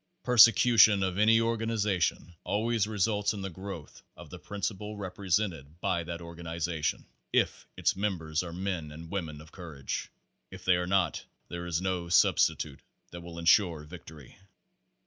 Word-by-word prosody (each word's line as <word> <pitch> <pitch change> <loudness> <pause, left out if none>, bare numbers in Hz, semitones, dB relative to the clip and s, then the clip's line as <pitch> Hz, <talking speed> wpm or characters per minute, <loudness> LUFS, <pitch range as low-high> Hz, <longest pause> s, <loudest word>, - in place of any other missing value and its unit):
Persecution 115 -3 +6
of 95 0 -1
any 110 +2 +5
organization 110 -6 0
always 110 0 0
results 105 0 0
in 100 - -6
the 95 - -4
growth 95 -3 -9 0.2
of - - -12
the - - -8
principle 105 +1 -5
represented 90 -5 -2
by 90 -2 0
that 85 +1 -6
organi 85 0 -8
zation 80 -2 -2 0.3
if - - 0
its - - +1
members 85 -6 -1
are 90 -2 -7
men 90 -4 -4
and 80 +2 -10
women 80 -7 -4
of 80 +2 -15
courage. 80 -7 -6 0.4
If 95 -1 -12
they 90 -1 +4
are 90 0 -2
not, 90 -4 +1 0.3
there 85 0 -5
is 85 0 -1
no 90 -2 -2
substitute 75 -4 +3 0.3
that 85 - -8
will 85 0 -10
insure 85 -1 +3
victory. 75 -3 -13
90 Hz, 150 wpm, -29 LUFS, 85-105 Hz, 0.4 s, Persecution